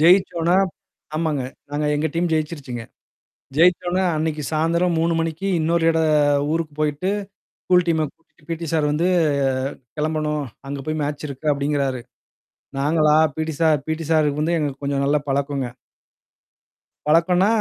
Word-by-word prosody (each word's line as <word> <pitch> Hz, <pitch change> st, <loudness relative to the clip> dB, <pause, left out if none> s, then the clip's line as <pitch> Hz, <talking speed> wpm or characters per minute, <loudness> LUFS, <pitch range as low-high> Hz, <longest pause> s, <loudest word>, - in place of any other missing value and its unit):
ஜெயிச்சோனா. 175 Hz, 0 st, +4 dB, 0.6 s
ஆமாங்க. 155 Hz, -4 st, 0 dB, 0.3 s
நாங்க 150 Hz, +1 st, -1 dB
எங்க 155 Hz, +2 st, 0 dB
டீம் 170 Hz, 0 st, 0 dB
ஜெயிச்சிருச்சுங்க. 145 Hz, -6 st, -2 dB, 0.7 s
ஜெயிச்ச 175 Hz, +2 st, +5 dB
உடனே 185 Hz, +2 st, +1 dB
அன்னைக்கு 155 Hz, -1 st, -1 dB
சாயந்திரம் 165 Hz, +2 st, +1 dB
3 165 Hz, +1 st, +2 dB
மணிக்கு 165 Hz, +4 st, -3 dB
இன்னொரு 165 Hz, +1 st, +1 dB
இட 160 Hz, 0 st, +1 dB, 0.5 s
ஊருக்கு 165 Hz, -2 st, -1 dB
போயிட்டு. 150 Hz, +5 st, 0 dB, 0.5 s
ஸ்கூல் 180 Hz, -1 st, +3 dB
டீம 160 Hz, -2 st, +2 dB
கூட்டிட்டு 165 Hz, -1 st, -30 dB
பிடி 165 Hz, 0 st, -3 dB
சார் 150 Hz, -2 st, +2 dB
வந்து 165 Hz, +4 st, +1 dB, 0.9 s
கெளம்பணும். 150 Hz, -1 st, -1 dB, 0.3 s
அங்க 140 Hz, -, -4 dB
போய் 155 Hz, 0 st, -1 dB
மேட்ச் 145 Hz, +1 st, -3 dB
இருக்கு 145 Hz, +3 st, -1 dB
அப்டிங்கிறாரு. 140 Hz, -3 st, -1 dB, 0.8 s
நாங்களா, 150 Hz, +1 st, +3 dB, 0.2 s
பிடி 160 Hz, 0 st, -2 dB
சார் 155 Hz, -2 st, +4 dB
பிடி 160 Hz, +1 st, -2 dB
சாருக்கு 150 Hz, -2 st, +2 dB
வந்து 170 Hz, +2 st, +1 dB
எங்க 150 Hz, -2 st, 0 dB
கொஞ்சம் 140 Hz, 0 st, 0 dB
நல்ல 145 Hz, +1 st, +3 dB
பழக்கங்க. 140 Hz, -1 st, -1 dB, 1.4 s
பழக்கம்னா, 175 Hz, +5 st, +4 dB
155 Hz, 135 wpm, -22 LUFS, 150-165 Hz, 1.4 s, ஜெயிச்ச